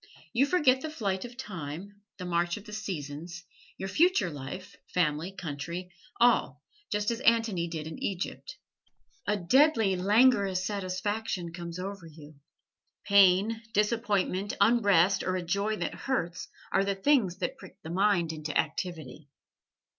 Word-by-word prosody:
You 270 +4 +3
forget 275 -7 +3
the 315 - -4
flight 200 -9 -2
of 240 0 -11
time, 195 - -7 0.2
the 180 - -6
march 175 0 0
of 210 - -11
the 210 - -10
seasons, 175 -4 -6 0.3
your 190 - -4
future 235 - +3
life, 145 +7 -8 0.2
family, 165 0 0
country 170 0 -6 0.3
all, 190 - +3 0.3
just 210 +2 0
as 230 - -3
Antony 225 -8 +2
did 160 -2 -5
in 160 0 -8
Egypt. 200 - -4 0.7
A 210 - +2
deadly, 225 - +4
languorous 200 -1 +3
satisfaction 185 -2 -3
comes 170 0 -6
over 190 -1 -6
you. 155 -1 -13 0.7
Pain, 200 +3 +4
disappointment, 210 -2 0
unrest 200 -5 +4
or 185 - -1
a 180 - -2
joy 200 +5 0
that - - -3
hurts, 180 -10 -3 0.2
are 195 - +3
the 200 0 0
things 195 -4 +2
that 180 -2 -3
prick - - -13
the 160 - -6
mind 180 -3 +2
into 155 -1 -3
activity. 155 -3 -3
190 Hz, 140 wpm, -29 LUFS, 170-215 Hz, 0.7 s, deadly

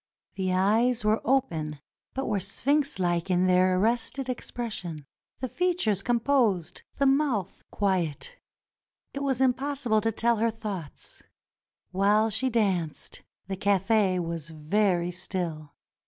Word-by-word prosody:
The 185 -1 -1
eyes 215 +5 +2
were 215 +1 +2
open 160 - 0 0.4
but 270 - -2
were 210 -3 0
sphinx 285 - 0
like 175 -1 0
in 180 0 +3
their 185 0 +4
arrested 235 +5 0
expression; 210 - -5 0.4
the 260 - -1
features 335 - 0
composed, 235 - +1 0.2
the 280 - +2
mouth 270 - +1
quiet. 190 - -1 0.8
It 280 - -4
was 270 -3 0
impossible 265 -3 +1
to 225 +1 +1
tell 230 +1 +1
her 230 +2 +2
thoughts. 205 -9 -7 0.7
While 205 +4 +3
she 255 +5 0
danced, 190 -9 -1 0.3
the 195 - -3
cafe 200 0 +2
was 165 -2 -4
very 175 +3 0
still. 170 -4 -5
210 Hz, 125 wpm, -27 LUFS, 180-245 Hz, 0.8 s, their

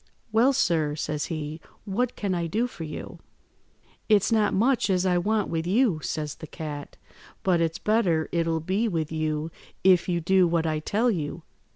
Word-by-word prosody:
"'Well, 230 +5 +4
sir,' 160 - +1
says 150 0 -2
he, 155 -1 -5 0.2
'what 235 +5 -1
can 200 -3 -2
I 170 -1 -1
do 220 +8 0
for 245 -9 -7
you?' 150 -1 -7 0.9
"'It's 210 +1 +4
not 215 -2 +3
much 230 0 +2
as 185 -1 +2
I 180 -1 +3
want 210 +2 0
with 165 0 -2
you,' 205 -4 +2
says 150 -1 -3
the 160 - -9
cat, 150 -2 -7 0.5
'but 180 -3 +3
it's 165 -1 0
better 190 -8 +1
it'll 165 -1 0
be 195 +8 0
with 160 -6 -2
you 155 0 -2 0.3
if 185 -1 +4
you 175 -1 +1
do 185 +2 +3
what 165 -1 +1
I 155 -1 0
tell 220 +9 +1
you. 160 -2 -4
175 Hz, 180 wpm, -26 LUFS, 160-205 Hz, 0.9 s, Well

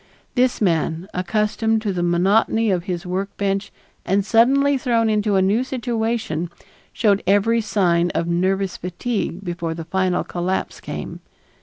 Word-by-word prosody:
This 250 0 +2
man, 165 -2 0
accustomed 215 +4 0
to 205 -3 -1
the 175 - -2
monotony 195 +5 +2
of 180 -2 -1
his 180 -1 -4
workbench 195 +2 -2 0.3
and 195 +1 +1
suddenly 275 +6 +4
thrown 235 -4 +1
into 210 -1 +1
a 190 - +4
new 210 +6 +2
situation, 230 - -2 0.4
showed 205 -3 +2
every 215 +4 +3
sign 175 -5 +2
of 170 - +1
nervous 185 +2 0
fatigue 190 0 -3
before 170 -2 -3
the 165 -1 -6
final 185 +1 0
collapse 180 +2 -3
came. - - -6
195 Hz, 140 wpm, -21 LUFS, 175-225 Hz, 0.4 s, suddenly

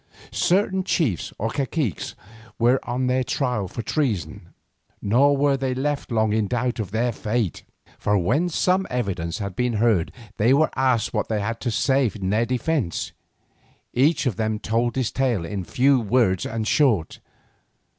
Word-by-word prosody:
Certain 190 +1 +1
chiefs 125 - 0
or 110 +2 -2
caciques 135 - -2 0.4
were 120 +3 +3
on 125 +2 0
their 130 +1 +1
trial 125 -7 -1
for 115 - -6
treason, 115 - -2 0.5
nor 135 +7 +3
were 140 0 +3
they 135 -1 -2
left 140 0 -2
long 110 -2 +2
in 110 -2 +1
doubt 125 +2 -1
as 110 - -2
to - - -21
their 120 +3 +1
fate. 110 -3 -2 0.4
For 105 0 +2
when 145 - +1
some 185 +3 +1
evidence 95 -9 -2
had 100 -3 -5
been 125 +3 0
heard 110 -6 +2 0.3
they 120 +6 +4
were 155 +2 +3
asked 130 -4 +1
what - - -1
they 110 -2 0
had 115 +3 -3
to 125 - -2
say 130 +2 +2
in 95 -2 -2
their 115 +3 +1
defence. 125 - -1 0.8
Each 145 +4 +2
of 120 -7 -1
them 110 -1 0
told 115 +3 -1
his 130 -4 0
tale 120 -10 0
in 100 +1 -4
few 130 +7 +3
words 110 -5 +1
and 110 -1 -3
short. 115 - +2
120 Hz, 165 wpm, -23 LUFS, 105-135 Hz, 0.8 s, they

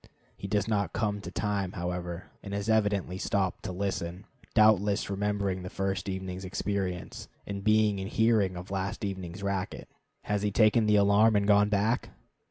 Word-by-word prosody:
He 100 - -7
does 105 +1 0
not 100 -5 0
come 105 -1 -1
to 90 - -7
time, 100 -1 -2
however, 90 -1 -4
and 100 -1 -6
has 100 +2 -3
evidently 105 -4 +1
stopped 95 -3 -1
to 95 - -3
listen; 90 0 -3 0.3
doubtless 105 -2 +4
remembering 100 -1 -1
the 90 - -6
first 95 +1 -2
evening's 95 0 -4
experience, 95 -1 -3 0.2
and 100 -1 -5
being 110 -1 +3
in 95 - -4
hearing 110 -4 +2
of 90 +2 -8
last 95 +1 -2
evening's 95 -1 -5
racket. 100 -1 -3 0.4
Has 105 -1 -1
he 105 - +1
taken 110 +1 +4
the 105 - +4
alarm 105 +2 +5
and 100 0 +2
gone 105 0 +5
back? 105 +4 +1
100 Hz, 170 wpm, -29 LUFS, 95-105 Hz, 0.4 s, alarm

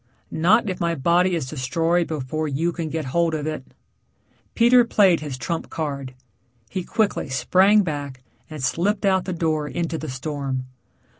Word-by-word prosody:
"Not 210 +8 +3
if 185 -2 -3
my 170 -1 0
body 175 +5 +2
is 155 -6 -3
destroyed 165 +6 0
before 155 0 -3
you 155 +5 0
can 165 -2 -4
get 155 -1 -3
hold 170 -1 +2
of 150 -1 -3
it." 155 -3 -4 0.9
Peter 240 +1 +6
played 195 -7 +4
his 145 -4 -6
trump 160 +7 -4
card. 140 -5 -4 0.6
He 185 - -2
quickly 210 -6 -1
sprang 185 +11 +4
back 145 -6 -5 0.3
and 155 -4 -7
slipped 185 +11 0
out 190 -1 +2
the 185 - -3
door 155 -3 -1
into 165 +1 -3
the 155 - -6
storm. 135 -1 -4
160 Hz, 160 wpm, -23 LUFS, 140-180 Hz, 0.9 s, Peter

